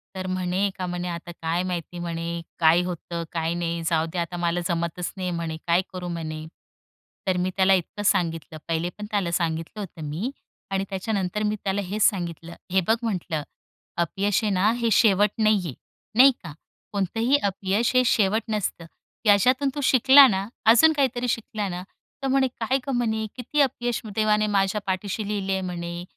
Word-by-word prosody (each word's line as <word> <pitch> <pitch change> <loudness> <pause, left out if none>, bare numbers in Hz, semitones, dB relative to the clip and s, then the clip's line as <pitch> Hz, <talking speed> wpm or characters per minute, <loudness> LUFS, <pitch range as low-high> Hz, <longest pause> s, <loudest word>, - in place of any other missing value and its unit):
तर 185 0 -4
म्हणे 185 +2 0
का 185 - -3
म्हणे 180 0 -3
आता 175 0 -6
काय 165 +2 0
माहिती 175 -1 -4
म्हणे 170 0 -4 0.2
काय 165 +2 +5
होतं, 170 -1 -4
काय 165 0 -1
नाही, 170 -1 -2
जाऊदे 165 +1 0
आता, 175 +1 -3
मला 175 0 0
जमतच 170 +1 -2
नाही 185 -1 -2
म्हणे, 165 -2 -3
काय 170 +2 +4
करू 180 -1 -5
म्हणे? 155 -2 -5 0.8
तर 185 -1 +2
मी 180 +1 0
त्याला 190 0 +5
इतकं 190 +3 -1
सांगितलं, 165 -4 0
पहिले 165 +1 -1
पण 210 - -6
त्याला 195 -5 0
सांगितलं 165 +3 -2
होतं 185 -5 -7
मी 200 - -3 0.4
आणि 195 0 0
त्याच्यानंतर 195 0 -2
मी 210 0 +1
त्याला 200 +1 0
हेच 205 +3 -1
सांगितलं, 170 -3 0 0.2
हे 190 0 +3
बघ 225 - +5
म्हटलं, 175 -8 -2 0.5
अपयश 195 +5 0
आहे 210 - +1
ना, 190 +3 +3
हे 235 -1 0
शेवट 205 -1 +5
नाहीये 210 -8 +2 0.4
नाही 270 +2 +9
का? 165 -4 -8 0.4
कोणतंही 225 +7 +1
अपयश 200 +3 0
हे 255 - +6
शेवट 215 -1 +2
नसतं, 205 -5 -2 0.4
याच्यातून 250 +7 +4
तू 290 - -2
शिकला 265 +2 +8
ना, 195 -3 -1 0.2
अजून 245 +9 +7
काहीतरी 255 -4 0
शिकला 215 -2 -2
ना. 180 0 -5 0.4
तर - - +1
म्हणे 265 0 +3
काय 245 +4 +1 0.2
म्हणे 220 -3 0
किती 260 +4 0
अपयश 245 -3 0
देवाने 215 -1 +2
माझ्या 200 0 +1
पाठीशी 200 +2 -2
लिहले 200 -2 -2
आहे 190 - -1
म्हणे, 175 -1 -5
190 Hz, 170 wpm, -25 LUFS, 170-215 Hz, 0.8 s, नाही